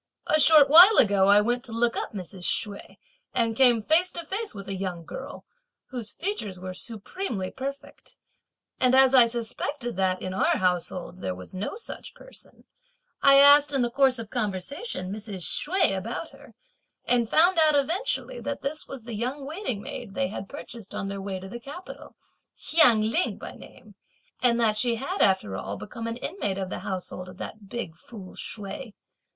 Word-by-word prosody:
"A 310 - +2
short 305 -2 +7
while 355 +9 +9
ago 200 -4 +4
I 205 +1 +7
went 240 +3 -1
to - - -7
look 230 +1 +1
up - - -3
Mrs. 185 -2 -8
Hsüeh 205 -2 -1 0.4
and 230 -2 +1
came 240 -3 +4
face 330 +8 +3
to 340 - -6
face 415 +5 -3
with 200 -1 -8
a 195 - -3
young 185 -3 -5
girl, - - -9 0.5
whose 240 -4 -5
features 280 - -4
were 185 0 -6
supremely 215 - -5
perfect, 275 +2 -8 0.6
and 255 0 +4
as 265 0 +6
I 245 -3 +8
suspected 240 +1 -4
that, 185 -1 +1
in 185 - -5
our 190 - +2
household, 180 0 -2
there 90 - -3
was 90 0 -11
no 190 - -4
such 460 - -8
person, - - -13 0.6
I 275 0 +7
asked 285 +1 +8
in 270 -3 +2
the 240 - -1
course 265 0 +3
of 225 -2 -8
conversation, 210 - -4
Mrs. 205 -4 -5
Hsüeh 350 - +1
about 230 - -5
her, - - -17 0.5
and 240 -2 +1
found 345 +2 +4
out 310 -2 +5
eventually 375 - -1
that 285 -1 -5
this 300 +3 -3
was 270 -4 -9
the 235 0 -7
young 255 +6 -3
waiting 285 - -4
maid 195 - -7
they 180 0 0
had 195 -1 -7
purchased 235 -7 -10
on 195 - -3
their 200 0 -5
way 195 -1 -4
to 190 - -9
the 240 +5 -8
capital, 285 +9 -10 0.4
Hsiang 275 -9 +5
Ling 330 +11 0
by - - -8
name, - - -15 0.5
and 240 -2 +3
that 220 -2 +2
she 235 +1 +1
had 275 - -3
after 190 - +2
all 100 +1 -5
become 230 +2 -7
an 230 +1 -3
inmate 245 - -3
of 190 -1 -4
the - - -3
household 185 -1 -5
of 180 - -13
that 205 0 -8
big 215 -9 -5
fool 190 +2 -12
Hsüeh. 210 +2 -5
230 Hz, 185 wpm, -26 LUFS, 195-280 Hz, 0.6 s, while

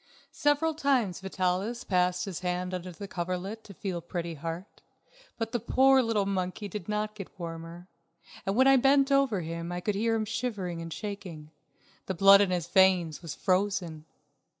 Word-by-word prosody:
Several 295 +2 +2
times 265 - +1
Vitalis 190 +4 -1
passed 180 -1 +1
his 190 -5 -5
hand 180 0 -2
under 180 0 -4
the 200 +4 -8
coverlet 185 +5 -4
to 200 - -11
feel 185 -3 -4
Pretty 170 0 -4
Heart, 165 +5 -7 0.6
but 225 -1 -3
the 240 - 0
poor 265 +4 +4
little 225 -4 +1
monkey 190 +1 -2
did 200 0 -7
not 210 0 -1
get 195 -3 -10
warmer, 165 +1 -7 0.6
and 195 - -1
when 260 +3 +5
I 270 0 +7
bent 275 +2 +4
over 275 -8 +3
him 170 +1 -5
I 175 - -3
could 205 +4 -1
hear 225 +3 +1
him 220 -1 -1
shivering 205 -6 -3
and 165 0 -7
shaking. 180 -7 -7 0.6
The 190 - -2
blood 195 +3 +8
in 200 - +2
his 175 -3 -1
veins 185 -5 +3
was 165 -4 -6
frozen. 185 -5 -1
190 Hz, 175 wpm, -29 LUFS, 175-220 Hz, 0.6 s, blood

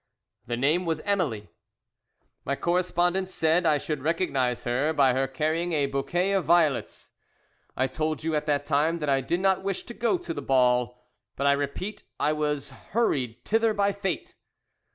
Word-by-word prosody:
"The 120 0 -2
name 155 +8 +2
was 160 -2 0
Emily. 155 - -1 0.9
"My 140 - -1
correspondent 180 +2 0
said 165 -1 +2
I 150 -2 +4
should 150 -1 -4
recognize 135 -6 0
her 135 +6 0
by 135 -4 +4
her 135 +1 +1
carrying 160 +6 -1
a 145 -2 +2
bouquet 175 +8 -1
of 195 -2 +1
violets. 160 -4 +1 0.7
"I 130 - +2
told 155 +3 -2
you 160 0 -1
at 150 0 -1
the 145 -1 +3
time 150 +3 0
that 150 -3 -3
I 135 -1 +3
did 170 +7 -1
not 190 -1 +2
wish 195 -1 -2
to 240 - -9
go 240 +10 +1
to 350 - -6
the 145 - -5
ball, 125 -2 +1 0.3
but 140 - -2
I 140 - +6
repeat 145 +9 -3 0.2
I 150 - +2
was 150 -2 -2
hurried 135 - -2
thither 225 0 +2
by 200 0 +2
fate. 195 -3 -4
155 Hz, 175 wpm, -26 LUFS, 135-180 Hz, 0.9 s, I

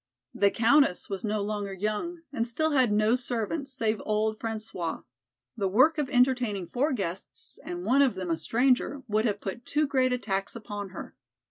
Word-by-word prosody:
The 200 - +4
Countess 235 -3 +3
was 195 -1 -3
no 210 -1 0
longer 205 -1 -3
young, 215 - -3
and 230 -3 0
still 315 +7 0
had 260 -6 +3
no 215 +3 +3
servants 255 +4 -3
save 225 -5 -1
old 215 0 0
François. 215 -7 -4 0.5
The 195 - 0
work 260 - +4
of 285 -3 -1
entertaining 245 -7 +2
four 265 - 0
guests, 190 -7 -4
and 175 +1 -5
one 260 +6 +4
of 265 -6 +3
them 185 -2 -3
a 165 - +1
stranger, 255 - +1
would 215 +1 +1
have 205 -3 0
put 205 +5 -5
too 300 +4 +1
great 260 -2 +2
a 250 - +2
tax 195 -3 -3
upon 205 -3 -6
her. 185 - -9
220 Hz, 185 wpm, -28 LUFS, 205-255 Hz, 0.5 s, The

